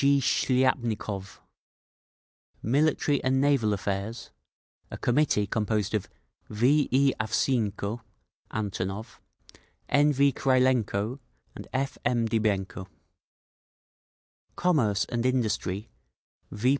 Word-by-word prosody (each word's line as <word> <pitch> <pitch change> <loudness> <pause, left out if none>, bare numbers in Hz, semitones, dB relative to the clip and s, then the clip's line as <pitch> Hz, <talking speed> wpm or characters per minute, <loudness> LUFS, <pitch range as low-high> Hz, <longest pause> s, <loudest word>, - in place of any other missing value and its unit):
G. 140 0 +4
Shliapnikov 120 -7 0 1.3
Military 145 +3 +1
and 130 0 +2
Naval 135 -6 +2
Affairs—a 100 +3 -6
committee 120 -5 +2
composed 105 +1 -1
of 105 -3 -1 0.4
V. 130 +8 +2
A. 135 -4 +2
Avseenko 110 -1 -1 0.5
(Antonov), 105 +1 -4 0.7
N. 145 +1 +4
V. 140 0 +3
Krylenko, 130 -4 +1 0.3
and - - -10
F. 135 0 -2
M. 120 -1 +1
Dybenko. 100 -4 -1 1.7
Commerce 125 - +2
and 120 -1 -2
Industry: 110 -5 -1 0.6
V. 110 +5 0
120 Hz, 85 wpm, -27 LUFS, 105-135 Hz, 1.7 s, G